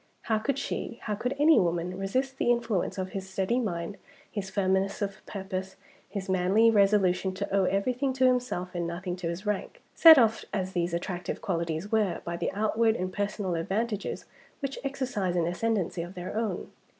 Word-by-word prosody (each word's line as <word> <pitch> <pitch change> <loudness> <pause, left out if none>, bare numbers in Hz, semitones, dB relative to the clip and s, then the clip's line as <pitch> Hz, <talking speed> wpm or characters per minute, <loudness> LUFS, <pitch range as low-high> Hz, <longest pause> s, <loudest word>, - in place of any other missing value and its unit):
How 220 -1 +1
could 275 +5 -1
she 235 -3 -4
how 215 - -2
could 245 +5 -2
any 305 +2 +6
woman 175 0 0
resist 260 +8 -2
the - - +2
influence 235 -7 0
of 185 0 -2
his 190 0 -6
steady 190 +6 0
mind, 185 -4 -3 0.3
his 195 -2 -4
firmness 190 0 +1
of 200 -1 -4
purpose, 190 -1 -5 0.3
his 200 -2 -5
manly 190 +5 +4
resolution 195 -3 +3
to 190 - -2
owe 195 -1 +4
everything 250 +8 0
to 260 0 +2
himself 245 -8 +1
and 175 -1 -2
nothing 175 +1 -4
to 180 -2 -4
his 170 +5 -5
rank, 210 - -3
set 325 -2 +10
off 225 -3 +3
as 190 -2 -2
these 175 -1 0
attractive 175 +1 -3
qualities 170 +1 -2
were 210 -6 +1
by 170 - -3
the - - -2
outward 220 +2 +2
and 185 -2 -3
personal 205 -2 -2
advantages 205 +5 -2 0.3
which 275 -1 -4
exercise 255 -10 -2
an 170 -2 +2
ascendancy 180 0 -1
of 175 +3 -7
their 180 +2 -6
own? 220 -5 -2
195 Hz, 180 wpm, -28 LUFS, 180-225 Hz, 0.3 s, set